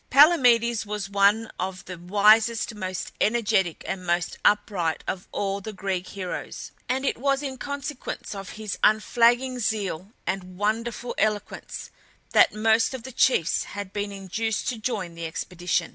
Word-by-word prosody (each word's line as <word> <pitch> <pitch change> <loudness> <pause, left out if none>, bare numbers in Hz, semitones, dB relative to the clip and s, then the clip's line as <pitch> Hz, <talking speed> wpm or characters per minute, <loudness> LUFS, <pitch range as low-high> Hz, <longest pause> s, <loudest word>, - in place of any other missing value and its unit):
Palamedes 245 -6 +5
was 205 -2 -5
one 205 +3 +3
of 185 0 -4
the 180 - -6
wisest, 215 +5 +4
most 185 -3 -4
energetic, 210 -6 +1
and 185 -1 -3
most 175 0 0
upright 200 -6 +1
of 185 -1 -4
all 200 0 -2
the 215 +2 -6
Greek 190 -2 -3
heroes, 185 -3 -6 0.2
and 265 +2 0
it 270 - 0
was 275 +2 +1
in 270 -2 -3
consequence 285 -2 -5
of 195 -2 -7
his 215 -2 -5
unflagging 240 +4 +3
zeal 200 -4 -2
and 185 -1 -4
wonderful 230 +3 -1
eloquence 215 -1 -2 0.4
that - - +6
most 220 +4 +2
of 250 - -8
the 260 - -8
chiefs 235 -9 +2
had 200 -2 -5
been 205 0 -2
induced 205 +3 -3
to 235 - -4
join 205 -6 -3
the 165 0 -5
expedition. 175 +1 -2
210 Hz, 150 wpm, -25 LUFS, 190-235 Hz, 0.4 s, that